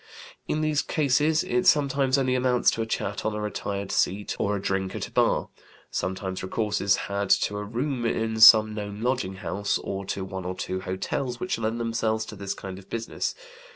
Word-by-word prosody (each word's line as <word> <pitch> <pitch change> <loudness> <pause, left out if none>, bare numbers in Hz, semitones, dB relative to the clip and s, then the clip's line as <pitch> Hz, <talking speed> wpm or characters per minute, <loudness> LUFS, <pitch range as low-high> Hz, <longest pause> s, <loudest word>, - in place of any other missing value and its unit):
In 155 - 0
these 155 -1 +1
cases 150 +1 +2
it 125 0 0
sometimes 140 -2 +3
only 130 -2 +1
amounts 125 -1 +3
to 115 - -3
a 110 - -2
chat 100 -2 -3
on 110 -1 -1
a - - -3
retired 100 -2 -3
seat 100 +2 0
or 100 +1 +1
a - - -2
drink 95 -1 -2
at - - -3
a - - -18
bar; - - +2 0.4
sometimes 95 0 -3
recourse 105 +2 -1
is 100 0 +4
had 100 0 -2
to 105 - +3
a - - -4
room 120 +4 -2
in 110 -1 -1
some 110 -1 +9
known 105 0 -5
lodging 125 -7 -1
house, 100 +1 -1
or 100 0 -5
to 95 0 -3
one 95 -1 -6
or 90 +1 -4
two 95 0 -3
hotels 120 +7 -3
which 185 -9 -2
lend 115 +1 -1
themselves 115 -1 -1
to - - -9
this 100 0 -4
kind 95 -1 -7
of 95 - -17
business. 115 -1 -3
110 Hz, 200 wpm, -26 LUFS, 100-125 Hz, 0.4 s, some